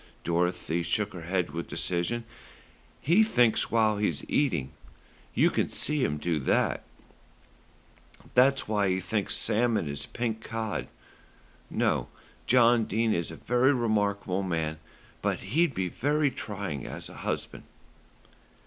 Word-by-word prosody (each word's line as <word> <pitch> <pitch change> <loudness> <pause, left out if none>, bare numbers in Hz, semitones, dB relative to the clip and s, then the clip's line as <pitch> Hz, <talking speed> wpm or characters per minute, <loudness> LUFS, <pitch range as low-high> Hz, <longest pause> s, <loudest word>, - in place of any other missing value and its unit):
Dorothy 85 0 0
shook 105 +4 -1
her 90 - -7
head 90 0 -1
with 85 +1 -5
decision. 90 +7 -2 0.8
"He 170 +9 +4
thinks 125 - +3
while 110 -2 +3
he's 85 -9 -1
eating. 85 - 0 0.6
You - - +4
can - - 0
see 150 -2 +1
him 75 - 0
do 80 0 -1
it. - - +1 1.5
That's 135 +2 +4
why 105 -2 +1
he 95 0 +1
thinks 100 +2 -1
salmon 115 -6 +2
is 70 -1 -5
pink 115 -2 -3
cod. 110 - -3 0.8
No; - - 0 0.4
John 120 -2 +5
Dene 110 +2 +1
is 85 - -1
a 80 - -7
very 125 - +2
remarkable 105 -5 0
man; 80 -4 -2 0.4
but - - -1
he'd 165 -1 +3
be 95 -1 0
very 145 - +1
trying 100 - -5
as - - -7
a - - -12
husband." - - -4
105 Hz, 130 wpm, -28 LUFS, 85-120 Hz, 1.5 s, John